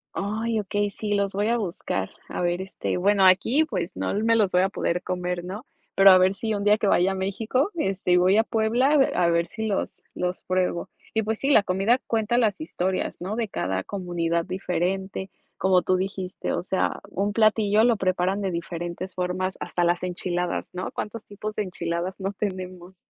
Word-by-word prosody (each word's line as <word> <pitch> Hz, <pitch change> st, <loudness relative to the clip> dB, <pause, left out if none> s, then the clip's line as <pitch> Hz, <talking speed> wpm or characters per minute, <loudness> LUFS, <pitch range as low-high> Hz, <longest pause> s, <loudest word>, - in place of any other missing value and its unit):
Ay, 220 Hz, +3 st, -1 dB
okey, 205 Hz, 0 st, -1 dB
sí, 205 Hz, 0 st, -2 dB
los 200 Hz, -1 st, 0 dB
voy 205 Hz, +2 st, 0 dB
a 235 Hz, +1 st, +2 dB
buscar. 170 Hz, -, -3 dB, 0.2 s
A -, -, -3 dB
ver, 175 Hz, +1 st, 0 dB
este, 190 Hz, -1 st, -3 dB
bueno, 195 Hz, +1 st, +4 dB
aquí, 230 Hz, +11 st, +4 dB
pues, 175 Hz, -, -4 dB
no -, -, -2 dB
me 225 Hz, +3 st, +2 dB
los 210 Hz, -4 st, +3 dB
voy 180 Hz, -, +4 dB
a 190 Hz, -, +2 dB
poder 175 Hz, -2 st, -1 dB
comer, 180 Hz, -1 st, -3 dB
¿no? 195 Hz, +6 st, -7 dB, 0.3 s
Pero 195 Hz, 0 st, +8 dB
a 185 Hz, -, +7 dB
ver 185 Hz, +1 st, +3 dB
si 220 Hz, +3 st, -2 dB
un 200 Hz, -, -2 dB
día 210 Hz, +1 st, +5 dB
que 215 Hz, -, -1 dB
vaya 190 Hz, -1 st, +3 dB
a -, -, -4 dB
México, 220 Hz, -, -1 dB
este, 195 Hz, -, -1 dB
y 180 Hz, -, +6 dB
voy 185 Hz, +3 st, +4 dB
a 225 Hz, -, +5 dB
Puebla, 235 Hz, +6 st, +2 dB
eh, 275 Hz, -2 st, +4 dB
a 175 Hz, -, +3 dB
ver 170 Hz, 0 st, +2 dB
si 220 Hz, +5 st, -5 dB
los 205 Hz, -2 st, -2 dB
los 180 Hz, 0 st, -3 dB
pruebo. 185 Hz, -2 st, -1 dB, 0.3 s
Y, 220 Hz, -, +2 dB
pues, 220 Hz, +1 st, -2 dB
sí, 275 Hz, -, 0 dB
la 220 Hz, -8 st, +6 dB
comida 195 Hz, +7 st, +2 dB
cuenta 225 Hz, +1 st, 0 dB
las 220 Hz, +2 st, +1 dB
historias, 190 Hz, -, -2 dB
¿no?, 190 Hz, +4 st, -3 dB
de 230 Hz, -1 st, -1 dB
cada 95 Hz, -, -2 dB
comunidad 170 Hz, -3 st, -2 dB
diferente. 190 Hz, +1 st, -2 dB, 0.3 s
Como 185 Hz, -1 st, +3 dB
tú 185 Hz, -, +1 dB
dijiste, 190 Hz, -1 st, -3 dB
o -, -, -1 dB
sea, 190 Hz, +1 st, -1 dB
un 200 Hz, +2 st, -1 dB
platillo 215 Hz, -1 st, +4 dB
lo 235 Hz, -1 st, +4 dB
preparan 185 Hz, +1 st, 0 dB
de 195 Hz, -2 st, -1 dB
diferentes 175 Hz, +2 st, -5 dB
formas, 185 Hz, +1 st, -2 dB
hasta 175 Hz, -, -1 dB
las 175 Hz, +1 st, +1 dB
enchiladas, 180 Hz, 0 st, -2 dB
¿no? 180 Hz, 0 st, -4 dB
¿Cuántos 215 Hz, +1 st, -5 dB
tipos 210 Hz, +1 st, -6 dB
de 210 Hz, -, 0 dB
enchiladas 175 Hz, 0 st, -3 dB
no 195 Hz, +1 st, -3 dB
tenemos? 185 Hz, -2 st, -5 dB
190 Hz, 205 wpm, -25 LUFS, 180-215 Hz, 0.3 s, Pero